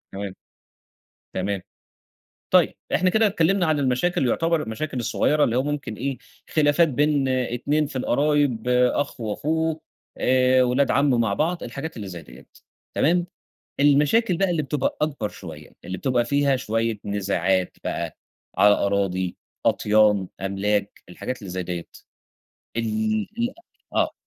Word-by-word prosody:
تمام، 100 -1 -6 1.0
تمام. 95 0 -2 0.9
طيب - - +4 0.2
إحنا 185 0 +3
كده 220 +3 +4
اتكلمنا 185 -1 +2
عن 155 -1 +2
المشاكل 135 +3 +1
يُعتبر 165 +4 +1
المشاكل 130 +5 -4
الصغيّرة 145 +5 +2
اللي 115 - 0
هو 130 - +3
ممكن 145 -5 -3
إيه 135 +4 -3 0.3
خلافات 155 +2 +4
بين 145 0 +1
2 130 +4 0
في 140 - -9
القرايب، 140 -3 +1
أخ 125 +2 +1
وأخوه، 155 +8 -1 0.4
آآ، 130 0 +4
ولاد 125 +3 +2
عَم 140 0 +3
مع 110 -4 +1
بعض، 170 - -1
الحاجات 135 +6 -6
اللي 105 -3 -6
زي 90 -3 -8
دِيّة، 65 -3 -15 0.5
تمام؟ 175 +3 +2 0.5
المشاكل 150 +8 +4
بقى 195 +1 +1
اللي 165 -3 0
بتبقى 140 -1 -1
أكبر 140 -8 -1
شوية، 80 -7 -10
اللي 90 +1 -5
بتبقى 125 0 +1
فيها 140 +2 +2
شوية 115 -2 -1
نزاعات 95 -2 0
بقى - - -3 0.4
على 105 0 +7
أراضي، 95 -3 0 0.3
أطيان، 105 -3 +3
أملاك، 100 +1 -1
الحاجات 125 +8 -5
اللي 100 -4 -8
زي 90 +1 -3
دِيّة، 85 -1 -5 0.9
ال 110 -1 0
ال 235 +1 +1 0.4
أ - - -2
آه. - - +2
125 Hz, 140 wpm, -24 LUFS, 105-150 Hz, 1.0 s, على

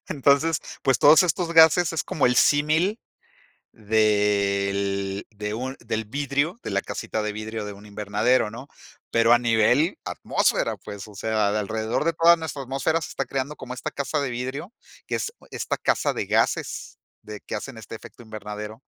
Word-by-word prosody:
Entonces, 145 +3 +2 0.2
pues, 135 -3 +2
todos 155 +5 +7
estos 175 0 -1
gases 165 +1 +6
es 160 - -1
como 145 - +1
el 125 - +2
símil 155 +9 +3 0.7
del 100 -2 +1
de 105 0 -5
un 130 +3 -4
del 110 0 -3
vidrio, 140 - -1
de - - -5
la 100 0 0
casita 110 - -4
de 105 0 -2
vidrio 110 0 -5
de 105 - -6
un 100 +1 -13
invernadero, 105 +3 +1
¿no? 130 +6 -10 0.4
Pero 115 0 +4
a 120 - +7
nivel 120 - +2
atmósfera, - - 0
pues, 100 0 -9
o 105 - -14
sea, 110 +1 0
alrededor 110 +5 -2
de 165 - +2
toda 170 +2 +6
nuestra 160 -4 -5
atmósfera 135 +5 0
se - - -6
está 135 - -3
creando 135 +3 -3
como 125 -1 -8
esta 125 - -5
casa 140 +2 -2
de 140 - -1
vidrio, 130 - -5 0.3
que - - -3
es 450 - -2 0.2
esta - - -3
casa - - +1
de - - -3
gases - - -1 0.2
de 105 -1 -9
que - - -7
hacen 115 +3 -6
este 110 0 -9
efecto 115 - -12
invernadero, 110 +1 -8
120 Hz, 175 wpm, -24 LUFS, 105-145 Hz, 0.7 s, todos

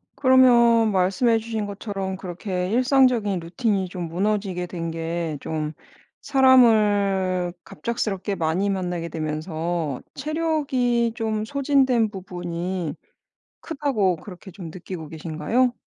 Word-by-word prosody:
그러면 235 -4 +5
말씀해 195 +5 +2
주신 220 -2 -3
것처럼 200 -2 -4
그렇게 180 0 -4
일상적인 245 -6 +3
루틴이 185 +3 -1
좀 180 -1 -5
무너지게 190 0 -1
된 165 -2 -4
게 165 -1 -3
좀 155 -1 -3 0.5
사람을 205 -8 +4
갑작스럽게 205 0 -3
많이 170 +4 0
만나게 180 -3 -2
되면서 155 -1 -3
체력이 275 -6 0
좀 220 -2 -2
소진된 265 -4 +2
부분이 180 -3 -4 0.7
크다고 265 - 0
그렇게 190 +3 -11
좀 175 -1 -9
느끼고 170 -1 -8
계신가요? 165 +11 0
195 Hz, 260 characters per minute, -23 LUFS, 175-235 Hz, 0.7 s, 그러면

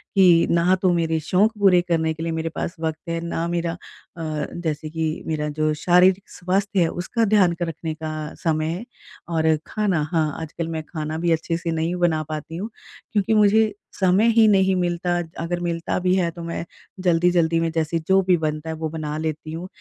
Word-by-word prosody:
कि 175 -3 +6
ना 170 +2 +4
तो 185 - +3
मेरे 165 -1 +1
शौक 185 +8 +2
पूरे 185 -3 +5
करने 160 -1 +1
के 160 +1 -7
लिए 165 - -2
मेरे 160 0 -2
पास 170 - -3
वक़्त 160 -1 -2
है, 165 0 -1
ना 170 0 -2
मेरा 170 -1 -1
अ, - - -9 0.8
जैसे 155 -2 -3
कि 160 0 -3
मेरा 150 -1 -1
जो 155 +1 0
शारीरिक 180 +4 +3
स्वास्थ्य 195 +2 0
है 165 - +4
उसका 225 +8 -1
ध्यान 200 -4 +4
क - - +3
रखने 160 0 -4
का 155 -1 -5
समय 155 -2 +1
है 175 +8 -4 0.4
और 160 -1 +2
खाना, 200 -7 0
हाँ 155 -2 +2
आजकल 160 +1 -5
मैं 160 -1 -3
खाना 155 -1 -4
भी 170 +1 0
अच्छे 165 +1 0
से 170 0 -3
नहीं 165 +2 -1
बना 170 -3 +1
पाती 155 +1 -5
हूँ। 205 +5 -4 0.4
क्योंकि 205 0 +2
मुझे 215 0 +4 0.3
समय 190 +3 +4
ही 225 -1 +5
नहीं 190 -2 +4
मिलता, 175 0 0 0.3
अगर 175 +1 -2
मिलता 170 -1 -2
भी 185 0 +2
है, 180 -3 +1
तो 170 - -10
मैं 170 0 -4 0.4
जल्दी-जल्दी 170 -1 +3
में 165 0 0
जैसे 160 0 0
जो 190 0 +5
भी 180 - +5
बनता 155 0 -3
है 160 - -3
वो 160 0 -3
बना 155 -1 -4
लेती 155 0 -4
हूँ। 170 +3 -5
170 Hz, 200 wpm, -23 LUFS, 160-180 Hz, 0.8 s, कि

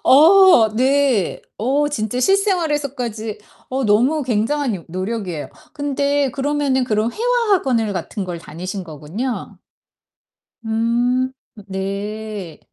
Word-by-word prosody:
어. 330 - +7
네. 260 -5 +2 0.2
어 280 +6 +1
진짜 220 -3 -2
실생활에서까지 285 - 0 0.3
어 265 0 -1
너무 245 +9 +3
굉장한 245 +1 0
요 170 - -8
노력이에요. 185 - -4 0.2
근데 285 -2 0
그러면은 275 -1 0
그럼 220 0 0
회화 470 -2 +2
학원을 235 - +1
같은 190 +2 -4
걸 175 -2 -5
다니신 180 +4 -6
거군요. 170 - -5 1.1
음. 240 +3 +1 0.4
네. 200 -1 -5
240 Hz, 225 characters per minute, -20 LUFS, 205-285 Hz, 1.1 s, 어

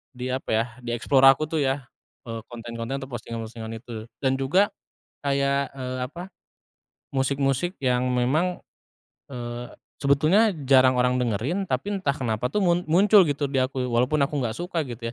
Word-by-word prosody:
di 125 +1 -4
apa 130 - -4
ya, 115 +1 +2
di 120 -1 -3
explore 135 +3 +4
aku 135 +3 +6
tuh 160 - 0
ya, 135 -1 0 0.4
eee, 115 -2 -6
konten-konten 120 +3 -5
atau 135 - -10
postingan-postingan 115 -1 -6
itu. 115 -1 -8 0.2
Dan 135 0 +1
juga 185 +11 +3 0.5
kayak, 140 0 0
eee, 130 -1 -5
apa, 175 +7 -9 0.9
musik-musik 135 +6 0
yang 125 -2 +1
memang, 150 +9 +1 0.7
eee, 120 -2 -6 0.3
sebetulnya 155 +11 +4 0.2
jarang 130 -1 +5
orang 125 0 +2
dengerin, 125 - -1
tapi 135 +11 -1
entah 140 -6 0
kenapa 115 -2 -1
tuh 210 - 0
mun 175 0 +3
muncul 200 +5 +6
gitu 145 0 -1
di 135 -1 0
aku 130 0 -1
walaupun 125 +5 +1
aku 150 - -6
nggak 115 -2 -2
suka 175 -2 -2
gitu 115 -1 -5
130 Hz, 160 wpm, -25 LUFS, 120-145 Hz, 0.9 s, aku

